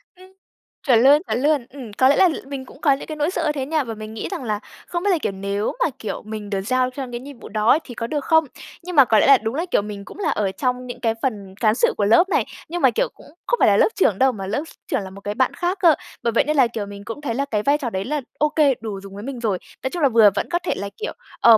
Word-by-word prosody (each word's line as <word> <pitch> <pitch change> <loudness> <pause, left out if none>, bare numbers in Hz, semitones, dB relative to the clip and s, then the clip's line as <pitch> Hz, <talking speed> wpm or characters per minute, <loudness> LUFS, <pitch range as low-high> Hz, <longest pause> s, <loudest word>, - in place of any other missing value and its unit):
Ừm, 370 +1 -16 0.6
chuẩn 235 -3 +5
luôn, 290 +3 +7
chuẩn 245 - -1
luôn. 290 -3 +2
Ừm, 250 -6 -10
có 260 +4 +4
lẽ 285 - +5
là 370 - +6 0.2
mình 275 -2 -6
cũng 270 - -16
có 295 - +4
những 270 - -5
cái 310 - -5
nỗi 300 +4 0
sợ 335 -3 -2
như 300 - +2
thế 275 -3 -3
nha, 310 0 0
và 230 -2 -5
mình 215 0 -8
nghĩ 220 - -4
rằng 340 -8 -4
là 210 -3 -2 0.3
không 345 0 -3
biết 410 - +2
là, 355 - +3
kiểu, - - -1
nếu 200 +2 -2
mà, - - +2
kiểu, 220 - -4
mình 215 -1 -6
được 195 -2 -1
giao 255 +4 +1
cho 265 +1 -5
những 245 0 -7
nhiệm 280 -3 -11
vụ - - -10
đó 215 +6 +3
thì 245 - -10
có 230 - -3
được 295 -1 -3
không? 320 -1 +4 0.4
Nhưng 360 -1 -6
mà 275 - +8
có 220 -3 +4
lẽ - - +3
là 275 -1 +8
đúng 220 +2 -4
là, 330 +4 -1
kiểu, - - +3
mình 200 -1 -7
cũng - - -12
là - - 0
ở 200 -2 0
trong 250 +5 -2
những 245 0 -7
cái 230 -2 +1
phần 200 -7 -3
cán 220 -2 +3
sự - - +2
của 205 - +1
lớp 230 - +5
này, - - +2 0.2
nhưng 350 +1 -3
mà, 265 - +5
kiểu, - - 0
cũng - - -19 0.2
không 485 - +2
phải - - +5
là - - +5
lớp - - +5
trưởng 220 - +2
đâu 265 0 +5
mà 195 -4 -6
lớp 225 +8 -1
s - - -13 0.2
trưởng - - 0
là 190 - -7
một 200 +1 -12
cái 205 +1 -3
bạn 260 0 +1
khác 360 +3 -2
cơ. 330 -4 +6 0.3
Bởi 235 - +1
vậy - - +4
nên 305 0 -1
là, 260 - +6
kiểu, 225 -3 -5
mình 200 0 -9
cũng 230 +7 -6
thấy 235 -6 -3
là 280 +1 0
cái 210 -2 0
vai 285 +4 +3
trò 270 -5 -3
đấy 190 -2 -3
là 295 +1 -2 0.2
ô 300 0 +3
kê, 295 -3 +3
đủ 210 -3 -5
dùng 195 0 -11
với 205 - -7
mình 265 -1 -5
rồi 215 -6 0 0.3
nói 260 - 0
chung 350 - -4
là 275 - +5
vừa 225 -3 +6
vẫn - - -2
có 345 0 +1
thể 355 - -2
là, 200 - -4
kiểu, 445 - -4 0.3
ờ, 230 -2 +8
250 Hz, 320 wpm, -22 LUFS, 215-295 Hz, 0.6 s, mà